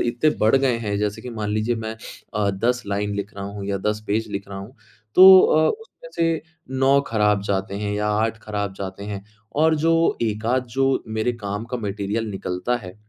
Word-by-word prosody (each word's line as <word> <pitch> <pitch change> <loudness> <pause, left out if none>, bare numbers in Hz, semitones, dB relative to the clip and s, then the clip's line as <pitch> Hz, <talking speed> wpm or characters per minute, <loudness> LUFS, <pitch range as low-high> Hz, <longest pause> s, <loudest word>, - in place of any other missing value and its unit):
इतने 120 +6 +2
बढ़ 110 +5 +5
गए 130 -3 +2
हैं 105 -3 -2
जैसे 105 0 -2
कि 125 - -6
मान 110 -3 -3
लीजिए 110 +3 0
मैं 110 0 -4 0.4
अ, 105 -1 +1
10 120 +6 0
लाइन 100 +1 -1
लिख 100 0 -5
रहा 100 - -5
हूँ 100 0 -6
या 100 -1 -1
10 105 0 -5
पेज 110 +2 0
लिख 100 0 -4
रहा 100 -1 -6
हूँ। 100 +6 -10 0.4
तो 190 0 +10
अ, 155 0 +4
उसमें 465 +3 -7
से 165 -1 +1 0.4
9 135 +1 +5
खराब 105 -2 +2
जाते 95 0 -2
हैं 105 -1 -2
या 105 0 -1
8 110 +2 0
खराब 105 -2 -3
जाते 95 0 -6
हैं 100 0 -6 0.4
और 160 0 +5
जो 165 0 +3
1 110 -1 -2
आध 130 - -1
जो 135 0 +2
मेरे 110 +2 0
काम 100 +2 -3
का - - +1
मटेरियल 105 0 -3
निकलता 95 +4 -2
है। 90 - -9
105 Hz, 205 wpm, -23 LUFS, 100-125 Hz, 0.4 s, तो